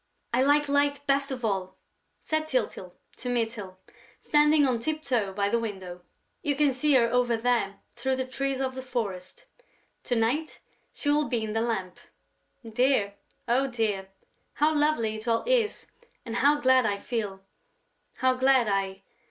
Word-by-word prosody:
"I 250 - +3
like 290 +2 +3
Light 285 0 +1
best 275 0 +1
of 255 -3 -4
all," 190 -3 -2 0.4
said 310 0 -2
Tyltyl 220 - -2 0.2
to 250 - -5
Mytyl, 225 -6 -2 0.4
standing 300 0 +4
on 250 -3 +1
tip 310 +5 -3
toe 225 -9 0
by 200 +1 0
the 235 +3 +1
window. 190 -5 -6 0.4
"You 290 -1 0
can 285 -1 +3
see 280 +3 +2
her 240 -2 +5
over 245 -2 +2
there, 225 -4 0
through 260 +2 -1
the 260 0 -2
trees 270 +1 -2
of 260 -1 -1
the 260 - -6
forest. 210 -8 -5 0.6
To 245 - 0
night, 245 +8 0 0.3
she 290 - -1
will 295 0 +2
be 235 -3 0
in 215 -1 -3
the 225 - 0
lamp. 190 -6 -3 0.7
Dear, 225 -3 +2 0.3
oh, 255 +3 +2
dear, 215 -6 -2 0.4
how 305 +2 +2
lovely 295 -8 +1
it 215 +2 -9
all 230 0 +1
is 480 -3 0 0.3
and 230 0 -4
how 290 +3 +4
glad 260 -2 +4
I 205 -3 0
feel, 200 -4 -4 0.7
how 260 0 +2
glad 260 -2 +3
I...." 195 -1 -1
245 Hz, 165 wpm, -27 LUFS, 215-275 Hz, 0.7 s, her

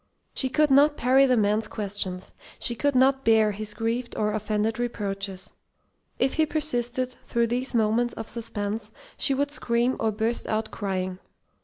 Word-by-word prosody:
She 260 - +1
could 300 +2 +2
not 290 +2 +5
parry 265 +3 +4
the 250 -1 +3
man's 215 +1 +1
questions. 195 -4 -2 0.2
She 240 - +1
could 285 +4 0
not 265 +1 +4
bear 220 -1 +4
his 210 +1 -5
grieved 230 +3 -2
or 210 0 0
offended 215 +1 -1
reproaches. 195 -5 -3 0.7
If 260 - +1
he 315 -1 +2
persisted, 255 -5 -1
through 235 0 +1
these 245 +2 -1
moments 230 +2 +1
of 225 - -6
suspense, 215 -2 -4 0.3
she 275 - +3
would 285 +1 0
scream 240 -2 0
or 220 -1 +1
burst 220 +3 -2
out 215 0 -2
crying. 185 -2 -3
230 Hz, 160 wpm, -26 LUFS, 210-255 Hz, 0.7 s, not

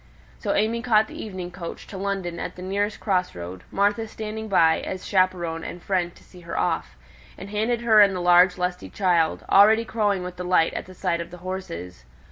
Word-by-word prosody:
So - - -1
AimÄe 225 +3 0
caught 220 -3 +4
the - - -8
evening 185 -4 -6
coach 175 -2 -8
to - - -10
London 190 -3 -3
at - - -5
the 180 - -9
nearest 200 +3 -1
cross 185 -3 0
road, 90 +1 -7
Martha 205 +3 +1
standing 220 0 -6
by 165 -5 +4
as 185 - -6
chaperon 180 -4 +1
and 175 - -6
friend 175 -1 -1
to - - -19
see 180 - -16
her 170 -1 -6
off, - - -1 0.4
and 200 - -9
handing 220 +3 0
her 220 -3 +6
in 200 -2 +5
the - - -2
large 180 +1 +5
lusty 180 0 -3
child, 175 -5 +1
already 220 +3 +6
crowing 205 -5 0
with 180 0 -7
delight 180 -2 +2
at - - -5
the 185 - -12
sight 175 -2 -1
of 170 - -7
the 180 - -10
horses. 90 - -6
185 Hz, 205 wpm, -24 LUFS, 175-205 Hz, 0.4 s, her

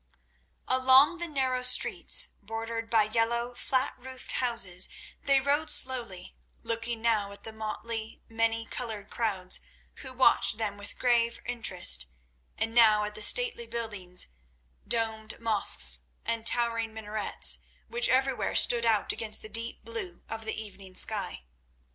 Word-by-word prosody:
Along 260 +6 +5
the 345 - -4
narrow 260 -4 -1
streets, 250 - +5
bordered 225 +2 -5
by 225 -2 +4
yellow, 235 +2 0
flat 260 +2 -1
roofed 260 0 -6
houses, 215 -8 0 0.3
they 275 -1 +3
rode 285 +3 0
slowly, 235 - +1 0.3
looking 230 0 -3
now 215 -4 +1
at 200 - -11
the 225 - -7
motley, 220 +1 -6
many 225 0 -1
coloured 220 -4 -5
crowds, 195 -6 0 0.4
who 260 - -5
watched 255 -3 +3
them 215 -3 -3
with 205 0 -9
grave 235 -2 +1
interest, 185 - +2 0.5
and 225 +1 -2
now 215 -3 +5
at 210 0 -4
the 215 - -7
stately 475 - +2
buildings, 205 -6 -3 0.6
domed 220 -1 -2
mosques 195 - +2 0.2
and 230 0 0
towering 230 -2 +1
minarets, 215 -1 +1 0.3
which 480 +1 +1
everywhere 265 0 0
stood 235 -1 +4
out 220 -3 +2
against 220 -2 -5
the 215 - -8
deep 230 +2 -3
blue 225 -7 -4
of 225 0 -7
the 220 - -3
evening 195 -3 -10
sky. 60 - -3
230 Hz, 135 wpm, -28 LUFS, 215-245 Hz, 0.6 s, Along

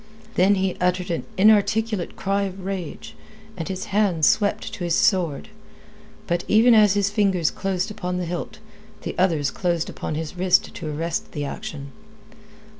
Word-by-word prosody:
Then 195 +1 +4
he 190 -1 0
uttered 180 0 0
an 165 - -2
inarticulate 215 -1 +3
cry 195 +1 0
of 190 -1 -7
rage, 165 - -5 0.4
and 165 -3 -5
his 190 -1 -4
hand 195 -7 +2
swept 205 +5 +1
to 180 - -5
his 170 -1 +1
sword. 175 -9 +1 0.8
But 175 +1 -1
even 230 +3 +5
as 210 -3 +5
his 200 -1 +1
fingers 195 -6 +2
closed 190 0 -2
upon 180 -3 -4
the 180 - -2
hilt, 175 +4 -5 0.5
the - - -4
other's 160 -7 +2
closed 170 -3 -1
upon 155 - -5
his 160 +2 -5
wrist 180 0 +2
to 155 -3 -5
arrest 165 +2 -3
the 145 -2 -3
action. 140 0 -7
180 Hz, 160 wpm, -23 LUFS, 165-200 Hz, 0.8 s, even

